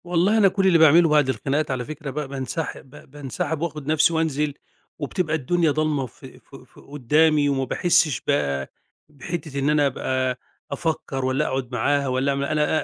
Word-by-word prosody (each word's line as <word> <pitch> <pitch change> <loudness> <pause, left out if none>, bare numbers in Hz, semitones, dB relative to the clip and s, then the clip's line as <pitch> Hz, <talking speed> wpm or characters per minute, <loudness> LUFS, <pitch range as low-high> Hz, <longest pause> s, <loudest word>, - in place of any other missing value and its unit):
والله 180 +5 +2
أنا 205 -3 +6
كل 190 0 +1
اللي 175 -3 +5
باعمله 160 +1 +6
بعد 150 -3 +3
الخناقات 140 +3 -1
على 125 -2 -3
فكرة 155 0 -7
بقى 150 +1 -4
بانسحب 135 +1 -5
ب 140 -1 -16
بانسحب 145 +3 -4
وآخد 150 -4 -4
نفسي 160 +2 +3
وانزل، 150 -2 0 0.5
وبتبقى 155 +2 -2
الدنيا 160 +3 +1
ضلمة 150 -2 0
ف 125 +2 -15
ف 130 - -15
ف 130 -2 -16
قدامي 145 +2 +2
وما 135 -1 0
باحسش 165 +2 +1
بقى 70 - -1 0.4
بحتّه 150 0 -6
إن 140 +2 +1
أنا 150 -1 +3
أبقى 130 -1 -2 0.3
افكر 150 -5 -3
والّا 130 +1 0
أقعد 130 -2 -3
معاها 140 +4 0
والّا 130 +2 0
م 140 - -2
أنا 150 +2 +1
145 Hz, 175 wpm, -23 LUFS, 135-160 Hz, 0.5 s, أنا